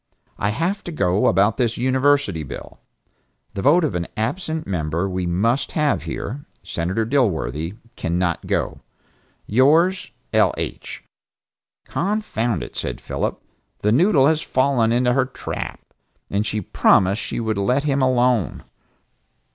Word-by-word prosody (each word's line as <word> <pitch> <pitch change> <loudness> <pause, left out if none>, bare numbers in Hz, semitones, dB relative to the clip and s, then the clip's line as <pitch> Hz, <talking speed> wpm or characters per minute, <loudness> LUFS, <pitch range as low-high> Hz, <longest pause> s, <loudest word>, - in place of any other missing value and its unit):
I 100 - +1
have 175 - -1
to 175 - -5
go 95 - +1
about 100 +4 +3
this 120 -2 0
University 130 - +2
bill, 70 - -9 0.7
the 100 - -3
vote 160 - +4
of 155 - 0
an 85 -1 -2
absent 155 - -2
member 85 0 -1
we 90 -1 -2
must 115 +10 0
have 150 -2 +1
here, 140 +7 -5 0.2
Senator 95 +7 -2
Dilworthy 90 - 0 0.2
cannot 85 0 -1
go. - - -1 0.6
Yours, 155 - +3 0.2
L. - - +3
H." - - -6 0.8
"Confound 190 - -1
it," - - -10
said - - -3
Phillip, - - -3 0.4
"the 105 - +3
noodle 145 - +4
has 155 +1 +3
fallen 130 -5 +2
into 125 +1 +2
her 135 0 +2
trap. - - -6 0.5
And 105 +2 0
she 105 0 -1
promised 95 +2 +3
she - - -4
would 110 -3 -1
let 125 +8 +1
him 140 -2 +1
alone." 125 - +2
120 Hz, 135 wpm, -21 LUFS, 95-140 Hz, 0.8 s, vote